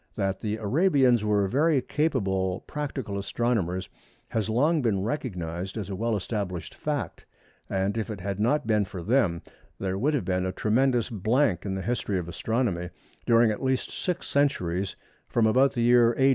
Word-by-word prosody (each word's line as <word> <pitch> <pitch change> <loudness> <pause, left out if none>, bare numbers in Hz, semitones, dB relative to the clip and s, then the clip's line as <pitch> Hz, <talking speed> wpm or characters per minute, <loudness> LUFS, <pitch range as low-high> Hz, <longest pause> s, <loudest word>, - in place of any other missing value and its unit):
That 95 -2 -1
the 105 0 -2
Arabians 130 - +3
were 105 -2 +2
very 145 +6 +3
capable 95 - 0
practical 135 -9 -4
astronomers 100 -4 -1 0.4
has 110 -1 -1
long 150 +8 +2
been 105 -6 +1
recognised 95 - -4
as 100 -2 -4
a - - -2
well 115 +3 0
established 95 -5 -3
fact, 150 -3 -4 0.4
and 95 +2 0
if 115 0 -2
it 105 -3 -5
had 100 +2 -4
not 145 +7 +2
been 105 -2 +2
for 90 -2 -7
them 100 -6 +1 0.4
there 95 0 -2
would 150 +6 +2
have 125 - -1
been 90 0 0
a - - -1
tremendous 120 +4 +1
blank 110 - +1
in 95 - -2
the 95 - -4
history 115 -5 -1
of 90 -2 -3
astronomy 95 -2 -1 0.4
during 115 -1 +5
at 105 - -4
least 130 -1 0
six 180 -1 -3
centuries 95 -10 0 0.3
from 115 - +2
about 130 +5 +4
the 120 - -1
year 120 -1 +5
A. 135 0 +5
110 Hz, 175 wpm, -27 LUFS, 95-130 Hz, 0.4 s, during